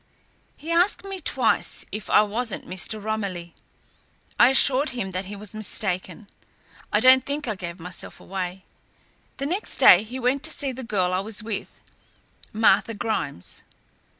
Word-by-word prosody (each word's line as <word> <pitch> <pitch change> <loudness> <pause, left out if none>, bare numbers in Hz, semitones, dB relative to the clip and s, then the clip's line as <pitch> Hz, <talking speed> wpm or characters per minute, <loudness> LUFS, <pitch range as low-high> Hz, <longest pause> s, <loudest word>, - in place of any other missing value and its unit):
"He 320 +3 -7
asked 355 +4 +2
me 390 -2 -6
twice - - +1
if 210 -1 -6
I 210 - +6
wasn't 220 +1 -3
Mr. 190 +4 -2
Romilly. 200 -5 -4 0.9
I 240 - +8
assured 270 +2 +3
him 240 -7 -3
that 185 +1 -3
he 205 +2 -7
was 205 0 -6
mistaken. 190 -2 -2 0.7
I - - +3
don't 260 0 +6
think 285 0 -4
I 215 - 0
gave 175 -2 -7
myself 180 +2 -6
away. 185 0 -5 0.7
The 275 - -3
next 365 +8 -1
day 180 - +8
he 230 +4 -7
went 260 +2 +1
to - - +1
see 280 -3 0
the 260 +1 -8
girl 185 -6 0
I 185 - +1
was 210 +2 -1
with, 215 -2 -6 0.7
Martha 215 0 +3
Grimes." 205 - -3
215 Hz, 155 wpm, -24 LUFS, 190-255 Hz, 0.9 s, I